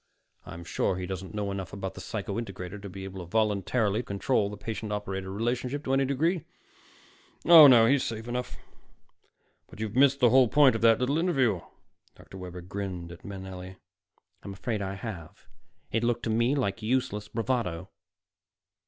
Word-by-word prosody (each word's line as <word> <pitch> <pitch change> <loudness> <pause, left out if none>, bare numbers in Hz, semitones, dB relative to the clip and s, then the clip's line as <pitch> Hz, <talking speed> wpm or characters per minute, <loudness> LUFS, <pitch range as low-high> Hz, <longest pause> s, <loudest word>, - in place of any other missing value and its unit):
I'm 85 +1 -8
sure 90 +2 -1
he 90 - -4
doesn't 95 +2 -6
know 100 -1 -2
enough 95 -3 -5
about 95 -1 -5
the - - -9
psycho 105 -1 -4
integrator 95 -2 -7
to 100 - -7
be 95 +1 -8
able 95 -1 -7
voluntarily 105 +1 +1
to - - -3
control 100 +1 0
the 105 - -8
patient 110 0 -5
operator 95 -2 -4
relationship 125 +7 -2
to 135 - -1
any 135 0 +3
degree. 155 +5 0 1.0
Oh, 165 -3 +10
no, 120 -4 +7
he's 135 +3 +3
safe 115 0 -5
enough. 125 +1 -4 1.1
But - - -14
you've 110 0 -4
missed 135 +1 +4
the 120 -3 +5
whole 130 -1 +6
point 135 0 +5
of 115 - -3
that 115 -1 +6
little 135 +5 +1
interview." 130 - +1 0.5
Dr. 95 - -13
Webber 90 -1 -8
grinned 90 -2 -6
at 85 - -12
Manelli. 95 -2 -8 0.7
"I'm 100 - -8
afraid 105 +2 -3
I 95 0 -3
have. 95 -6 -8 0.5
It 115 +1 0
looked 120 0 0
to 115 - -1
me 115 +5 +2
like 115 -5 -1
useless 110 -3 -1
bravado." 115 -8 -2
110 Hz, 170 wpm, -28 LUFS, 95-125 Hz, 1.1 s, Oh